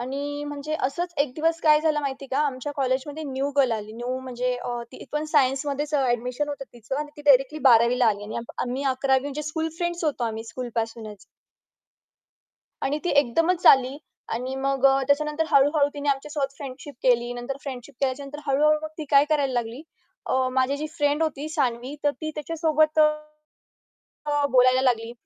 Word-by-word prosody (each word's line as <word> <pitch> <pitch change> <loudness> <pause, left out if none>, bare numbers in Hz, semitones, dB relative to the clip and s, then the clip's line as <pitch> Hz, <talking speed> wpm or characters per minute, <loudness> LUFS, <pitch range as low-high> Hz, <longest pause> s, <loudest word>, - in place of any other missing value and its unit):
आणि 285 +3 -4
म्हणजे 290 +1 -4
असंच 340 +6 -2
एक 280 -4 -5
दिवस 330 +1 0
काय 305 -2 +5
झालं 310 -1 +1
माहिती 275 -1 -4
आहे 270 - -12
का? - - +2
आमच्या 270 +1 -4
कॉलेजमध्ये 275 +3 -1
न्यू 275 0 -2
गर्ल 265 -4 +4
आली. 215 -1 -4
न्यू 245 +3 -4
म्हणजे 250 -1 -2
अ, 240 -1 -3
ती - - -10
पण 300 +1 -1
सायन्समध्येच 285 +1 +1
अ, 290 - +4
ॲडमिशन 250 +4 -1
होतं 285 -1 -5
तीचं 240 +2 -6
आणि 295 0 -4
ती 295 - -10
डायरेक्टली 270 +2 +5
12वी 235 +1 +5
ला 245 - +4
आली 205 -1 0
आणि 215 - -6 0.3
आम्ही 255 +3 -3
11वी 265 0 +2
म्हणजे 285 +2 -5
स्कूल 320 +2 -2
फ्रेंड्स 345 -1 -2
होतो 280 -5 0
आम्ही 225 -1 -4
स्कूल 240 +2 -6
पासूनच. 225 -2 -4 1.7
आणि 290 +3 0
ती 355 - +1
एकदमच 330 +8 0
आली 265 0 +6 0.4
आणि 255 +3 -3
मग 275 0 -1
अ, 270 0 +4
त्याच्यानंतर 300 +2 +1
हळू-हळू 285 0 +4
तिने 290 0 -4
आमच्यासोबत 280 0 -1
फ्रेंडशिप 280 +1 -8
केली. 240 -1 +2
नंतर 245 +3 -5
फ्रेंडशिप 265 0 -8
केल्याच्यानंतर 275 +2 -2
हळू-हळू 300 +2 +3
मग 310 - -4
ती 310 - -4
काय 280 -1 +6
करायला 285 -3 +1
लागली. 240 +3 -3 0.4
अ, 260 0 +1
माझी 260 +2 +1
जी 305 - -4
फ्रेंड 290 0 +1
होती 305 -1 -2
सानवी, 260 -2 -1
तर 290 - +4
ती 310 - -3
त्याच्यासोबत, 310 0 +1
अ, 305 0 0 1.0
बोलायला 255 0 +5
लागली, 235 -3 +1
275 Hz, 180 wpm, -25 LUFS, 255-300 Hz, 1.7 s, आली